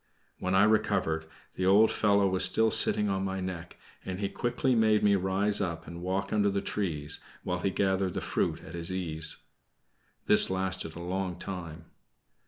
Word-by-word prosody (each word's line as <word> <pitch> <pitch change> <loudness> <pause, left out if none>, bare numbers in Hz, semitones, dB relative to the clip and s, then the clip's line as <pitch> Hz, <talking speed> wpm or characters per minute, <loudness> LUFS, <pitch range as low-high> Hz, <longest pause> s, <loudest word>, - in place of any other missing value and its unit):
When 95 +1 -1
I 95 - +5
recovered, 95 -7 +1 0.3
the 95 - -1
old 105 +4 +5
fellow 100 -2 +2
was 95 -1 0
still 110 0 +5
sitting 105 - +3
on 95 -1 -1
my 95 0 -3
neck, 90 -2 -6 0.3
and 95 0 -5
he 100 -1 -2
quickly 125 +4 -1
made 110 -2 +3
me 105 -1 +4
rise 100 +2 +1
up 85 -4 -3
and 85 0 -9
walk 95 +3 -2
under 105 -1 +2
the 100 0 -1
trees, 80 -8 -2 0.2
while 90 -1 -2
he 95 - 0
gathered 95 -1 0
the - - -1
fruit - - -2
at 80 - -11
his 85 +1 -5
ease. 80 -4 -2 0.9
This - - +6
lasted 95 -4 -2
a - - -8
long 90 0 -3
time. 85 -4 -7
95 Hz, 180 wpm, -29 LUFS, 90-100 Hz, 0.9 s, This